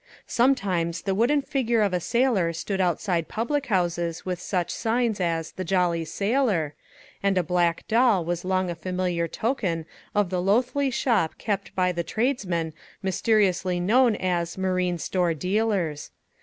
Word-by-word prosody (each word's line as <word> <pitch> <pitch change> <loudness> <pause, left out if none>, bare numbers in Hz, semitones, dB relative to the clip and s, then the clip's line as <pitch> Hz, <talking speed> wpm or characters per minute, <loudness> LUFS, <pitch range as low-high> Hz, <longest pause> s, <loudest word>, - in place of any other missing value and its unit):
Sometimes 190 -10 +1
the 195 - 0
wooden 255 +8 +2
figure 245 -6 +1
of 200 -3 0
a 180 - +2
sailor 220 -5 +1
stood 190 +4 -2
outside 175 -1 0
public 275 +5 -2
houses 175 -4 -1
with 180 -1 -3
such 180 -3 -1
signs 230 -2 0
as 165 -2 -1
"The 185 - -5
Jolly 175 -2 +1
Sailor"; 200 - 0 0.5
and 195 -1 +1
a 180 - +3
black 175 0 0
doll 225 -6 +3
was 175 0 -2
long 185 -1 0
a - - -2
familiar 180 0 -2
token 185 - -2 0.3
of 205 -3 +2
the 180 -1 0
loathly 250 +8 +2
shop 235 -9 +1
kept 200 -2 -3
by 180 -1 +2
the 170 -1 -2
tradesmen 185 - -1 0.3
mysteriously 190 -2 +1
known 230 +5 +4
as 175 -3 -1
Marine 185 -2 0
Store 175 0 0
Dealers. 185 -3 -1
185 Hz, 150 wpm, -25 LUFS, 175-225 Hz, 0.5 s, known